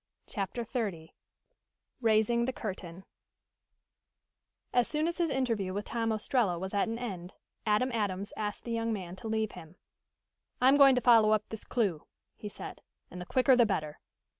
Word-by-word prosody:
CHAPTER 210 +3 -4
XXX 205 -9 -4 0.9
RAISING 230 +1 +3
THE 260 - -2
CURTAIN 185 -5 -6 1.7
As 245 -2 +3
soon 305 +1 0
as 340 0 -3
his 340 -2 +2
interview 230 -9 -1
with 205 - -3
Tom 230 -1 -1
Ostrello 215 -3 +1
was 190 +3 -5
at 200 +3 +1
an 225 +1 -3
end, 190 -7 -6 0.3
Adam 215 +5 +2
Adams 205 -3 -2
asked 210 -1 -4
the 235 - -5
young 230 0 -1
man 185 -4 -4
to 205 - -7
leave 220 -1 -1
him. 170 -1 -12 0.8
"I 255 - +5
am 280 - +5
going 275 -2 +7
to 250 - +1
follow 225 -3 +6
up 210 -1 0
this 220 - -6
clew," 200 -11 -1 0.3
he 210 - -7
said. - - -9 0.3
"And 180 - -7
the 180 - -8
quicker 260 0 +4
the 245 - +6
better." 155 -7 -2
220 Hz, 170 wpm, -30 LUFS, 190-240 Hz, 1.7 s, going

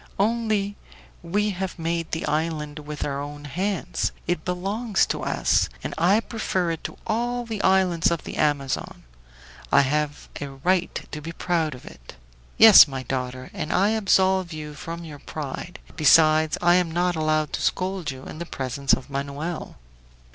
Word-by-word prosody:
"Only 210 -1 0 0.4
we 205 +5 0
have 190 0 -4
made 165 0 -2
the 160 - -3
island 155 -1 -2
with 150 0 -5
our 140 -1 -3
own 145 0 -7
hands; 185 +6 -2
it 175 -2 -1
belongs 195 +4 0
to - - -3
us, - - +1
and - - -4
I 190 +6 +3
prefer 190 -7 -1
it 165 - -5
to - - -6
all 240 +2 -1
the 220 -3 -4
islands 185 -3 +3
of 170 -2 -2
the - - -7
Amazon. 145 -3 -1 0.7
I 140 - +6
have 145 +1 -1
a 145 - -3
right 175 +7 -1
to 150 - -6
be 165 +2 -6
proud 165 -4 -1
of 125 - -14
it." - - -13 0.4
"Yes, 220 -6 +10
my 135 -2 -5
daughter; 130 0 -4
and 150 - -4
I 200 +3 +3
absolve 190 -4 +2
you 150 -1 -6
from 170 +2 -7
your 150 -3 -9
pride. 155 +4 -6 0.2
Besides, 155 0 +5
I 175 +1 +6
am 180 -2 +1
not 175 +1 +1
allowed 155 -1 0
to - - -2
scold 185 -3 -1
you 130 -1 -7
in 155 - -9
the 170 - -5
presence 135 0 -1
of - - 0
Manoel!" 140 +4 -5
165 Hz, 170 wpm, -24 LUFS, 150-190 Hz, 0.7 s, Yes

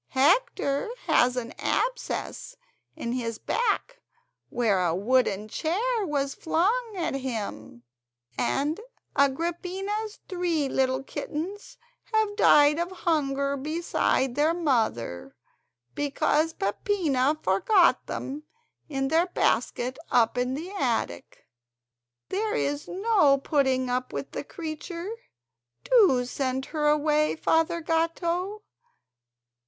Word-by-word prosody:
Hector 285 - +2 0.2
has 250 +1 +3
an 235 -1 -4
abscess - - -2 0.4
in 235 - -4
his 230 -3 -2
back - - -1 0.5
where 205 -6 +1
a 170 -2 +1
wooden 215 0 +1
chair 420 - -1
was 280 -2 -1
flung 425 +8 0
at 340 - -1
him; 220 - -5 0.5
and 290 - 0 0.4
Agrippina's 360 +9 -1
three 345 -6 0
little 260 0 0
kittens 355 +9 -6 0.4
have 430 -2 +2
died 295 -6 +5
of 345 +1 -1
hunger 280 -6 0
beside 280 -3 0
their 300 +5 +2
mother, 220 - -1 0.6
because 295 +2 +1
Peppina 290 - 0
forgot 340 - +3
them 280 +3 -5 0.5
in 270 -2 -1
their 330 +4 +3
basket 250 -4 0
up 230 -1 +3
in 250 +1 0
the 335 +6 -6
attic. 235 - -2 0.8
There 430 +3 -1
is 290 -8 -1
no 375 -7 +3
putting 265 -2 +1
up 250 +1 -2
with - - -5
the - - -4
creature—do 315 - -1
send 260 +1 -2
her 300 -1 +1
away, 300 0 +2
Father 325 +1 +1
Gatto! 340 +5 -1
295 Hz, 105 wpm, -27 LUFS, 255-355 Hz, 0.8 s, died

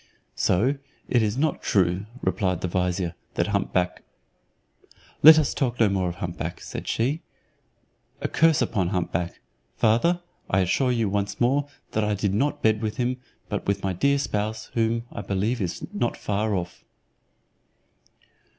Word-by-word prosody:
"So, 125 +10 +2 0.3
it 120 - +3
is 105 +1 0
not 155 +1 0
true," 95 +1 +1 0.2
replied 90 -4 0
the - - -1
vizier, 90 -1 -1 0.2
"that - - +2
hump - - -1
back 90 -1 0 0.6
" - - -30
"Let 160 +2 +11
us 155 -3 +2
talk 125 -4 -1
no 110 -3 +5
more 95 -2 0
of 85 - -6
hump 90 0 -5
back," 80 +2 -4
said - - -7
she, 135 +8 0 1.0
"a - - -1
curse 160 -2 +4
upon 95 -6 0
hump 90 -1 -1
back. 85 0 -3 0.3
Father, 145 +11 +3 0.3
I 95 - +3
assure 125 +8 +2
you 115 -3 +1
once 100 0 -2
more, 135 +4 +2 0.2
that 110 - 0
I 105 0 +1
did 100 -1 0
not 145 +7 0
bed 110 0 +3
with 110 +1 -3
him, 125 0 0 0.3
but - - -4
with 100 - 0
my 95 -1 0
dear 140 +10 +2
spouse, 110 -4 -2
who, 115 0 +1
I - - -5
believe, 105 +5 -1
is 90 -3 -3
not - - -1
far 105 +1 -1
off." 90 -1 -5
105 Hz, 170 wpm, -25 LUFS, 95-125 Hz, 1.0 s, Let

